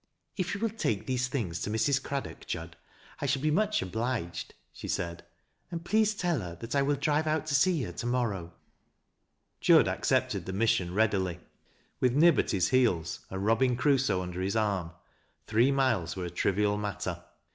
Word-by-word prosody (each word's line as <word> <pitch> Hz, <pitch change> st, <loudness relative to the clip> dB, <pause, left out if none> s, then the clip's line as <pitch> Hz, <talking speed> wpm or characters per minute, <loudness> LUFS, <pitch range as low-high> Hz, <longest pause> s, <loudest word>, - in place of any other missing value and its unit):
" -, -, -51 dB
If 185 Hz, 0 st, -2 dB
you -, -, -5 dB
will 225 Hz, -2 st, +1 dB
take 115 Hz, -, -1 dB
these 130 Hz, -1 st, 0 dB
things 100 Hz, -11 st, -3 dB
to -, -, -2 dB
Mrs. 130 Hz, +6 st, +1 dB
Craddock, 140 Hz, -1 st, -5 dB
Jud, 80 Hz, 0 st, -5 dB, 0.4 s
1 140 Hz, -, -2 dB
shall 135 Hz, 0 st, +1 dB
be 155 Hz, -, +2 dB
much 210 Hz, +6 st, +1 dB
obliged," 110 Hz, -3 st, -3 dB, 0.2 s
she -, -, -8 dB
said; 85 Hz, -1 st, -3 dB, 0.3 s
" -, -, -45 dB
and 170 Hz, 0 st, -5 dB
please 215 Hz, +2 st, +2 dB
tell 175 Hz, -6 st, 0 dB
her 90 Hz, -4 st, -6 dB
that 115 Hz, +7 st, -9 dB
T 140 Hz, -, +2 dB
will 145 Hz, +1 st, +2 dB
drive 150 Hz, +2 st, +1 dB
out 155 Hz, 0 st, 0 dB
to 155 Hz, -, -2 dB
see 160 Hz, +1 st, +3 dB
her 90 Hz, -, -4 dB
to 115 Hz, -, -5 dB
morrow." 110 Hz, -9 st, -1 dB, 1.1 s
Jud -, -, +6 dB
accepted -, -, 0 dB
the 95 Hz, -, -3 dB
mission 95 Hz, -4 st, +1 dB
readily. 95 Hz, -5 st, +1 dB, 0.6 s
With 125 Hz, 0 st, +2 dB
Nib 165 Hz, 0 st, +6 dB
at -, -, 0 dB
his 90 Hz, -3 st, +1 dB
heels, 95 Hz, -11 st, +2 dB
and 95 Hz, 0 st, -4 dB
" -, -, -2 dB
Eobinson 120 Hz, +3 st, +3 dB
Crusoe 130 Hz, -8 st, +2 dB
" -, -, -3 dB
under 90 Hz, 0 st, -5 dB
his 95 Hz, +3 st, -1 dB
arm, 100 Hz, -6 st, 0 dB, 0.6 s
three 115 Hz, +5 st, +3 dB
miles 120 Hz, -12 st, +1 dB
wcro 90 Hz, -2 st, -4 dB
a -, -, -4 dB
trivial 105 Hz, +1 st, +1 dB
matter. 105 Hz, -2 st, -4 dB
115 Hz, 195 wpm, -29 LUFS, 95-140 Hz, 1.1 s, Jud